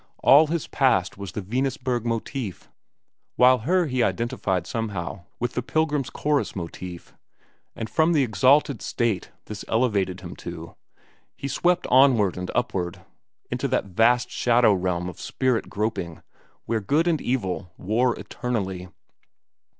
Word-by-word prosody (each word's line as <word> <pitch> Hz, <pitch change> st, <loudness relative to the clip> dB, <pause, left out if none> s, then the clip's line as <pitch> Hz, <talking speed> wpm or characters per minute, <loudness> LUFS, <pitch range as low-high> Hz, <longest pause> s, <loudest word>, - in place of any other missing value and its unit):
All 145 Hz, +4 st, +7 dB
his 165 Hz, 0 st, -2 dB
past 115 Hz, -10 st, +1 dB
was 100 Hz, -2 st, -7 dB
the 105 Hz, -, -4 dB
Venusburg 125 Hz, +2 st, -1 dB
motif, 115 Hz, -, -4 dB, 0.6 s
while 125 Hz, +1 st, +6 dB
her 175 Hz, +9 st, +2 dB
he 130 Hz, -4 st, -1 dB
identified 95 Hz, -7 st, -1 dB
somehow 95 Hz, -4 st, -4 dB
with 120 Hz, 0 st, -2 dB
the -, -, -1 dB
Pilgrim's 150 Hz, +1 st, 0 dB
Chorus 150 Hz, -1 st, -1 dB
motif; 90 Hz, -1 st, -7 dB, 0.6 s
and 110 Hz, -, -4 dB
from 160 Hz, +7 st, +2 dB
the 150 Hz, -5 st, +3 dB
exalted 130 Hz, +2 st, +3 dB
state 115 Hz, -7 st, -1 dB, 0.2 s
this 105 Hz, -1 st, -7 dB
elevated 100 Hz, -6 st, 0 dB
him 85 Hz, -, -8 dB
to, -, -, -8 dB, 0.6 s
he 140 Hz, -, -4 dB
swept 175 Hz, +5 st, +1 dB
onward 125 Hz, -8 st, +5 dB
and 90 Hz, 0 st, -5 dB
upward 95 Hz, -8 st, -2 dB, 0.5 s
into -, -, -1 dB
that -, -, 0 dB
vast 120 Hz, +5 st, +3 dB
shadow 120 Hz, -3 st, +4 dB
realm 90 Hz, -2 st, -1 dB
of 90 Hz, -, -8 dB
spirit 130 Hz, -3 st, -1 dB
groping, 100 Hz, -6 st, -3 dB, 0.4 s
where 115 Hz, -1 st, -1 dB
good 150 Hz, -, +1 dB
and 160 Hz, -4 st, +1 dB
evil 95 Hz, -8 st, -2 dB
war 115 Hz, +5 st, +1 dB
eternally. 95 Hz, -7 st, -3 dB
115 Hz, 135 wpm, -24 LUFS, 95-130 Hz, 0.6 s, All